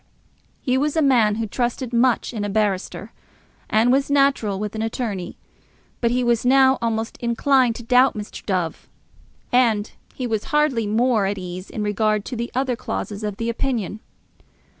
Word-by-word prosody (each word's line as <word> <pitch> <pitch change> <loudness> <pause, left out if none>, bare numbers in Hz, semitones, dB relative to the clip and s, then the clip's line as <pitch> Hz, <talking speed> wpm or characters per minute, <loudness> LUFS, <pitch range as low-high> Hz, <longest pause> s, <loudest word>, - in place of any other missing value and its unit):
He 255 0 +1
was 300 +3 0
a - - +4
man 235 -6 +4
who 225 +1 -2
trusted 245 +2 -2
much 245 +1 +2
in 215 -3 -3
a 205 - -2
barrister, 205 -2 -1 0.6
as 220 +2 +3
was 270 +3 +2
natural 275 -8 +2
with 210 +1 -4
an 220 - -4
attorney; 220 -5 -3 0.6
but 235 - +1
he 250 +1 +1
was 235 -2 +2
now 265 +1 +5
almost 225 -1 -2
inclined 245 0 +2
to 235 - -8
doubt 250 +2 +4
Mr. 210 -1 -7
Dove. 180 -5 -3 0.6
And 230 -4 +2 0.2
he 255 - -4
was 220 -3 -2
hardly 270 -6 +1
more 220 -1 +2
at 200 +1 -2
ease 185 0 -7
in 215 - -4
regard 210 0 0
to 255 - -5
the 235 +1 -3
other 260 -1 0
clauses 215 -3 -5
of 210 -2 -3
the 230 - -3
opinion. 230 -4 -2
230 Hz, 170 wpm, -22 LUFS, 210-255 Hz, 0.6 s, now